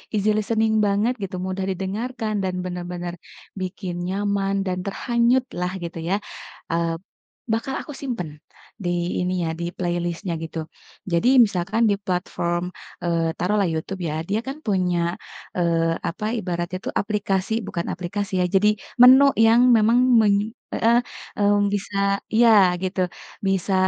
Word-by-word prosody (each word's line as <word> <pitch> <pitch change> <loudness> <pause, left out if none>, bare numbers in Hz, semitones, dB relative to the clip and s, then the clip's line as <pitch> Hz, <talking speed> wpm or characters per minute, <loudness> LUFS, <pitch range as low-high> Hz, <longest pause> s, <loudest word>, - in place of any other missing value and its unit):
easy-listening 215 +2 +1
banget, 205 +5 +2
gitu, 190 -1 -4
mudah 190 0 -2
didengarkan, 215 +4 -3
dan, 185 -1 -1
benar-benar 175 -1 -5 0.5
bikin 185 -1 -4
nyaman 195 0 0
dan 180 -1 -1
terhanyut 240 +4 +1
lah, 180 0 -1
gitu 170 -1 -5
ya, 200 - +2 0.5
eee, 165 0 0 0.6
bakal 265 +4 -1
aku 295 - -8
simpan 240 - -4 0.5
di, 175 -2 -2
ini 180 -2 -1
ya, - - -1
di 170 0 -3
playlist-nya, 175 0 -2
gitu. 160 -1 -5 0.4
Jadi, 170 +9 +3 0.2
misalkan 200 +4 -1
di 200 - +3
platform, 180 -2 -2 0.3
eee, 165 -1 +1
taruhlah 200 +3 +2
YouTube 170 +4 -4
ya, 155 +1 -2
dia 210 +2 +1
kan 280 +3 -5
punya, 180 -3 +1 0.4
eee, 165 -1 +2
apa 210 +5 -5
ibaratnya 180 -4 -3
tuh, - - -3
aplikasi 200 0 0
bukan 170 -1 -3
aplikasi, 190 +1 -3
ya. - - +2
Jadi, 210 +2 +4 0.3
menu 265 +2 +9
yang 225 +2 +6
memang 225 +1 +5 0.2
men 205 -2 +4 0.4
heeh, 235 +1 +4 0.4
mmm, 205 0 +3
bisa 200 0 0
iya 215 -6 +6
gitu, 185 -1 0 0.4
bisa 195 0 0
195 Hz, 135 wpm, -23 LUFS, 175-215 Hz, 0.6 s, menu